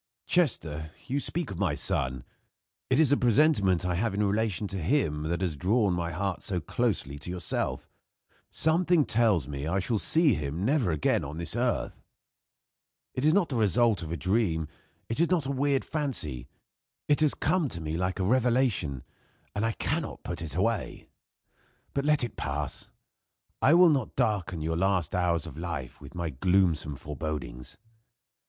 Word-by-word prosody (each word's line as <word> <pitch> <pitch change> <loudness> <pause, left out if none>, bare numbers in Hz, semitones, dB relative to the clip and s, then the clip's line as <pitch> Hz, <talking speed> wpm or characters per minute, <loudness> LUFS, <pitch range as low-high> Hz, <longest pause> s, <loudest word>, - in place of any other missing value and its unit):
"Chester, 80 - 0
you 135 +3 -1
speak 160 -2 -2
of 95 - -6
my - - +1
son. 65 -1 -2 0.7
It 130 +2 +3
is 155 -4 +4
a 145 - +5
presentiment 115 - +3
I 90 - 0
have 100 +3 0
in 105 +1 +1
relation 105 -1 0
to 95 - -4
him 80 - +1
that 85 +2 -1
has 90 -5 -1
drawn 100 - +2
my 85 -1 -2
heart 95 +2 -2
so 90 -3 -2
closely 85 - -2
to 75 - -7
yourself. 90 -2 -3 0.6
Something 165 -1 +3
tells 105 - +2
me 70 0 -4
I 90 +4 0
shall 110 +3 0
see 160 - +3
him 75 +2 -3
never 135 - +2
again 80 -3 +1
on 75 +4 -6 0.2
earth. 120 0 -1 1.1
It 130 - -3
is 155 - +5
not 195 -4 +3
the 130 - -1
result 110 0 +3
of 80 -1 -6
a 85 - -2
dream; 90 -2 0 0.4
it 115 - -3
is 170 - +3
not 175 -6 +2
a 135 - -1
weird 140 0 +1
fancy; 130 - -3 0.6
it 145 - +3
has 155 -2 +3
come 160 -2 +1
to 85 - -6
me 80 -1 -3
like 90 +3 -1
a - - +1
revelation, 120 - +1 0.5
and 100 - -1
I 115 0 +1
cannot - - -2
put - - -5
it 80 -3 -4
away. 110 +4 -1 0.8
But 140 0 -1
let 150 -3 +3
it 120 - -4
pass. 75 -1 -3 0.7
I 150 +5 +6
will 175 0 +7
not 135 -6 0
darken 90 -6 0
your 80 +1 -1
last 95 -3 +1
hours 85 -3 +1
of 80 -2 -8
life 80 -8 -5
with 70 - -12
my 85 -2 -2
gloomsome 80 0 +1
forebodings. 75 -2 -6
95 Hz, 170 wpm, -28 LUFS, 80-130 Hz, 1.1 s, will